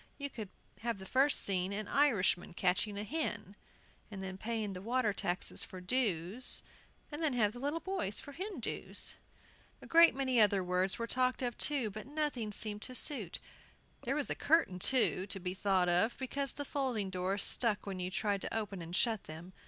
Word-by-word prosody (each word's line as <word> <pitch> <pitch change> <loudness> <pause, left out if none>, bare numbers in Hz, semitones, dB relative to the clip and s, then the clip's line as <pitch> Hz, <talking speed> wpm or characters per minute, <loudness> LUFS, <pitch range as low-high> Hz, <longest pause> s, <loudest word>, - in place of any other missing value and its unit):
You 280 -1 -5
could 215 -5 -7 0.3
have 230 -2 -2
the 190 - -10
first 270 +7 +3
scene 185 -1 +1
an 205 +1 -3
Irishman 205 -11 +2
catching 190 +3 0
a 205 - -3
hen, 215 - -3 0.5
and 195 -3 -7
then 190 0 -5
paying 215 0 -3
the 180 - -7
water 230 0 0
taxes 180 -2 -1
for 185 - -9
"dues," 200 0 +1 0.5
and 295 +2 -5
then 310 -4 +1
have 215 -4 +2
the 245 - -9
little 290 +5 -1
boys 375 - -2
for 285 - -9
Hindoos. 360 - -2 0.7
A - - -12
great 335 -2 +6
many 260 -3 +2
other 200 -2 +4
words 180 +1 0
were 230 - -2
talked 255 +2 0
of, 245 -1 -1 0.4
but 215 +3 -8
nothing 285 -7 -2
seemed 210 0 +2
to 255 - -2
suit. 240 - +3 0.7
There 265 +3 -1
was 295 -2 0
a - - +3
curtain, 300 - +2
too, 215 -4 +2
to 195 - -4
be 180 0 -3
thought 190 -2 +1
of, 180 +7 +2
because 275 0 -3
the 285 - -5
folding 250 -9 -2
doors 185 +2 -1
stuck 220 -4 +3
when 195 -2 -5
you 180 0 -2
tried 200 +1 -1
to - - -3
open 205 -4 -4
and 170 +1 -5
shut 220 -1 +1
them. 165 +4 -10
215 Hz, 190 wpm, -33 LUFS, 190-260 Hz, 0.7 s, great